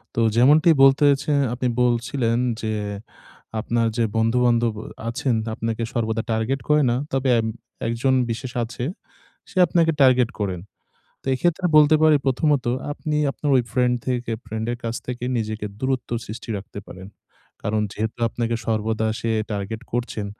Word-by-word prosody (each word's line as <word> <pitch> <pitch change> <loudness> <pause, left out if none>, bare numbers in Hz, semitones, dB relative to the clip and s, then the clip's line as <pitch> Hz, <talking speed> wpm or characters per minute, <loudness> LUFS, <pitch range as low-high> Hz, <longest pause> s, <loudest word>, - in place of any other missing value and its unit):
তো - - 0 0.2
যেমনটি 150 +7 +5
বলতেছি 140 +2 +4 0.2
আপনি 125 +1 -1
বলছিলেন 120 0 +1 0.2
যে, 110 -1 -2 0.9
আপনার 115 +1 0
যে 115 - +2
বন্ধু-বান্ধব 115 0 +2
অ - - -11 0.2
আছেন 125 0 0 0.2
আপনাকে 115 +1 -3
সর্বদা 110 -1 -1
টার্গেট 115 +4 -1
করে 150 0 +5
না, 120 - +1 0.2
তবে 135 0 0
এব 110 - -1 0.4
একজন 120 +3 +1 0.2
বিশেষ 120 +2 -4
আছে 120 +1 -6 0.7
সে 190 - -12
আপনাকে 165 -1 +3
টার্গেট 130 -3 +5
করেন। 95 -4 -2 0.6
তো - - -27
এক্ষেত্রে 175 +6 0
বলতে 150 +1 +6
পারি 155 -1 +6
প্রথমত 140 0 +1 0.3
আপনি 150 0 -3
আপনার 145 - -3
ওই 125 - +2
ফ্রেন্ড 125 -1 +2
থেকে 120 -2 -1
ফ্রেন্ড 110 +1 -4
এর 120 - -3
কাছ 115 0 -2
থেকে 125 -1 -5
নিজেকে 110 -1 -3
দূরত্ব 130 -2 -2 0.2
সৃষ্টি 115 +2 -8
রাখতে 100 +1 -8
পারেন। 95 +1 -10 0.5
কারণ 105 +1 0
যেহেতু 110 +2 -4
আপনাকে 115 0 -2
সর্বদা 110 0 0
সে 115 - -1 0.2
টার্গেট 105 +3 -4
করছেন, 120 -3 -2
120 Hz, 150 wpm, -23 LUFS, 110-135 Hz, 0.9 s, বলতে